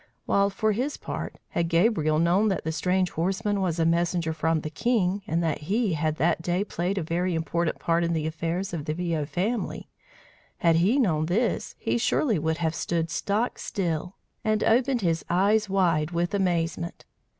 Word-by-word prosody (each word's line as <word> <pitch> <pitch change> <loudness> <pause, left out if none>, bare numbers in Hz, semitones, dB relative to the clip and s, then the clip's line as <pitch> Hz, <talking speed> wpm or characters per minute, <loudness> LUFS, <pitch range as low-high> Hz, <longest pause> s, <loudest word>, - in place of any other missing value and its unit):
While 200 0 +3
for 215 +2 0
his 255 +8 -2
part, - - -5
had 170 -1 -1
Gabriel 165 -3 +2
known 175 +6 +3
that 195 - -1
the 160 - -2
strange 180 +2 0
horseman 195 +4 -1
was 175 -3 0
a 165 - +2
messenger 170 0 +1
from 160 0 0
the 155 - -5
king, 200 -1 +1
and 165 +2 0
that 160 -2 0
he 215 -2 +1
had 155 0 0
that 165 +1 +1
day 175 +3 0
played 185 -1 -2
a 190 - 0
very 175 +2 -1
important 165 0 -1
part 170 0 +1
in 170 0 0
the 155 -2 -1
affairs 165 +4 -3
of 155 -4 -4
the 155 - -2
Viaud 165 -4 -1
family, 210 +8 -2 0.7
had 165 -1 +3
he 195 +10 +3
known 160 - +2
this, 220 +7 0
he - - -1
surely 230 - +1
would 160 +1 0
have 160 -2 0
stood 165 0 -2
stock 210 +7 -1
still 180 -2 -3 0.3
and 215 -1 +1
opened 245 +2 +3
his 165 -3 0
eyes 205 +4 +2
wide 170 -6 +2
with 175 +1 -1
amazement! 170 -3 -1
175 Hz, 185 wpm, -26 LUFS, 165-200 Hz, 0.7 s, While